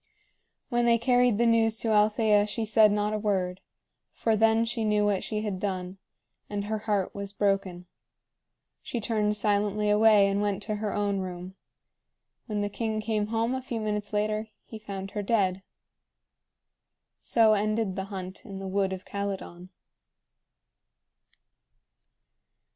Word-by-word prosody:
When 240 -2 +1
they 235 0 +5
carried 245 -1 +3
the 235 - +2
news 225 -1 +3
to 230 - -1
Althea 210 0 +3
she 220 +2 -3
said 215 -1 +5
not 210 +1 0
a 215 - -1
word, 190 -3 -1 0.5
for 225 -1 0
then 225 +1 +3
she 230 0 -2
knew 210 -1 +2
what 200 -2 +1
she 215 -1 -3
had 200 -4 -3
done, 185 -1 -4 0.5
and 205 -1 -3
her 215 +1 -2
heart 200 -3 0
was 200 0 -6
broken. 195 -3 -1 1.0
She 240 - -4
turned 210 -1 0
silently 210 0 +1
away 210 -1 +5
and 200 +1 0
went 205 -1 -1
to 215 0 -3
her 210 -1 -2
own 205 -1 0
room. 180 0 -6 0.9
When 210 -3 -2
the 205 - 0
king 220 +1 -3
came 215 -1 -1
home 230 +2 0
a 260 - -2
few 245 -3 -4
minutes 210 -1 -3
later, 215 +1 -1 0.2
he 220 - -9
found 195 -2 -7
her 210 - -3
dead. 195 -3 +1 1.6
So 225 -2 +4
ended 215 -1 0
the 190 -1 -3
hunt 190 -2 -7
in 200 -3 -8
the 195 0 -6
wood 190 0 0
of 185 - -8
Calydon. 195 -3 -5
210 Hz, 150 wpm, -27 LUFS, 195-220 Hz, 1.6 s, they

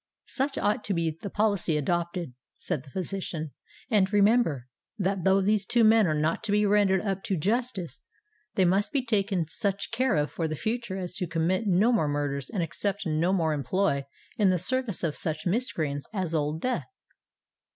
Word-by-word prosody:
"Such 275 +1 -2
ought 210 +4 0
to 200 - -1
be 165 -2 -1
the 200 - -4
policy 200 -7 +1
adopted," 170 0 -2 0.2
said 170 -7 -3
the 140 - -15
physician: 175 -2 -4 0.4
"and, 200 -3 +3
remember, 205 - +3 0.3
that 195 -2 -1
though 190 +1 +4
these 205 +1 +2
two 235 +4 +2
men 220 -2 +6
are 155 - +1
not 155 +2 0
to 210 - -1
be 210 0 +3
rendered 200 -2 +3
up 195 -2 -2
to 190 - 0
justice, 210 0 -2 0.5
they 190 - +4
must 195 +3 +2
be 275 -4 0
taken 200 -6 +1
such 200 +3 -1
care 240 -3 +1
of 150 0 0
for 165 - -2
the 155 - -3
future 220 +2 -3
as 180 -2 -5
to 180 - -2
commit 170 +6 0
no 200 +6 +4
more 185 -10 +2
murders 145 -2 -2
and 190 -5 -1
accept 195 +5 -2
no 160 +2 +1
more 165 -5 +1
employ 150 0 0 0.3
in 210 - +4
the 185 -1 +3
service 255 +1 -1
of 160 -3 0
such 155 +3 -3
miscreants 160 - -1
as 185 -5 -2
Old 155 0 -1
Death." 255 -2 -1
190 Hz, 185 wpm, -27 LUFS, 160-210 Hz, 0.5 s, men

